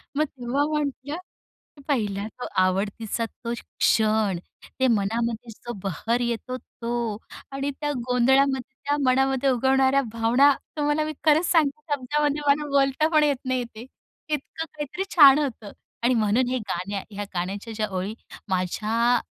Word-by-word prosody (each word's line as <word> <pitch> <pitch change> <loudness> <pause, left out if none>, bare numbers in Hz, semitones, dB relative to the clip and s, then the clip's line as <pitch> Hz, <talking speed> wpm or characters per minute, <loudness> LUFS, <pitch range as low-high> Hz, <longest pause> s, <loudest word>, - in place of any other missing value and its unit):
मग 300 - +3
तेव्हा 270 0 -2
म्हटलं 290 0 -2 0.7
पहिला 210 -8 0
तो 245 - -7
आवडतीचा 200 +4 0
तो 235 +1 -7
क्षण. 215 -4 +1 0.4
ते 260 - +4
मनामध्ये 230 +2 0
जो 240 +2 -8
बहर 225 +6 -1
येतो 240 +2 -2
तो 235 -3 -4 0.3
आणि 275 +1 -2
त्या 295 0 0 0.2
गोंधळामध्ये 265 +1 +2
त्या 290 +1 +1
मनामध्ये 265 +1 +2
उगवणाऱ्या 265 +2 +3
भावना 235 +5 +4 0.3
तुम्हाला 295 +1 +1
मी 310 - -3
खरंच 315 +2 +5
सांगते 305 -3 +2
शब्दामध्ये 290 +2 0
मला 290 +1 +3
बोलता 280 +2 +3
पण 305 -1 +5
येत 290 -2 +2
नाही 255 -1 0
ते. 230 -1 -10 0.4
इतकं 305 +2 -3
काहीतरी 305 +5 -4
छान 285 -4 +9
होतं 230 -8 -3 0.3
आणि 245 +2 +4
म्हणून 230 +2 +2
हे 255 - 0
गाण्या 195 +3 -3
ह्या 205 0 -4
गाण्याच्या 195 +6 -3
ज्या 215 0 -1
ओळी 195 +4 -3 0.3
माझ्या 215 +6 +1
250 Hz, 140 wpm, -25 LUFS, 220-280 Hz, 0.7 s, छान